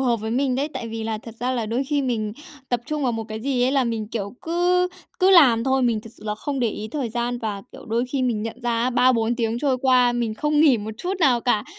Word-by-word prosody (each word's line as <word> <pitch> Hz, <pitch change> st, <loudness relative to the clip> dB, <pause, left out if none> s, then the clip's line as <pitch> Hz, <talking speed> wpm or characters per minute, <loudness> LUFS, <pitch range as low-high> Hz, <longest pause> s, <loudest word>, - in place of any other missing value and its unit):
hợp 245 Hz, -3 st, +2 dB
với 220 Hz, +1 st, -5 dB
mình 260 Hz, +1 st, +1 dB
đấy. 280 Hz, +3 st, -1 dB
Tại 230 Hz, -, -4 dB
vì 225 Hz, 0 st, -5 dB
là 220 Hz, -1 st, -2 dB
thật 230 Hz, 0 st, -11 dB
ra 250 Hz, -, 0 dB
là 235 Hz, -4 st, -2 dB
đôi 240 Hz, +5 st, -1 dB
khi 285 Hz, 0 st, 0 dB
mình 220 Hz, -5 st, -1 dB, 0.4 s
tập 245 Hz, -2 st, 0 dB
trung 300 Hz, -1 st, -2 dB
vào 245 Hz, -2 st, +1 dB
một 225 Hz, -1 st, -3 dB
cái 220 Hz, 0 st, -5 dB
gì 255 Hz, -1 st, 0 dB
ấy 260 Hz, -, +1 dB
là 270 Hz, -2 st, +3 dB
mình, 225 Hz, -3 st, -3 dB
kiểu, 210 Hz, -1 st, -4 dB
cứ 355 Hz, +2 st, +2 dB, 0.3 s
cứ 375 Hz, +1 st, +4 dB
làm 255 Hz, -10 st, +6 dB
thôi. 265 Hz, 0 st, +2 dB
Mình 235 Hz, -3 st, +1 dB
thực 225 Hz, -, -12 dB
sự -, -, -16 dB
là 210 Hz, 0 st, -2 dB
không 275 Hz, +4 st, -4 dB
để 235 Hz, -, +2 dB
ý 215 Hz, 0 st, -5 dB
thời 265 Hz, -1 st, -3 dB
gian, 240 Hz, +1 st, -2 dB
và, 210 Hz, -4 st, -4 dB
kiểu, -, -, -11 dB
đôi 230 Hz, +2 st, 0 dB
khi 270 Hz, -, 0 dB
mình 230 Hz, -4 st, 0 dB
nhận 225 Hz, +1 st, -5 dB
ra 240 Hz, +1 st, 0 dB
3-4 240 Hz, -2 st, +2 dB
tiếng 230 Hz, -1 st, -1 dB
trôi 275 Hz, -2 st, +1 dB
qua, 250 Hz, -2 st, +4 dB
mình 235 Hz, -3 st, -1 dB
không 300 Hz, +4 st, +1 dB
nghỉ 295 Hz, -5 st, +6 dB
một 210 Hz, +1 st, -5 dB
chút 365 Hz, +2 st, -2 dB
nào 250 Hz, -6 st, +4 dB
cả. 220 Hz, -4 st, +1 dB
240 Hz, 275 wpm, -23 LUFS, 225-270 Hz, 0.4 s, làm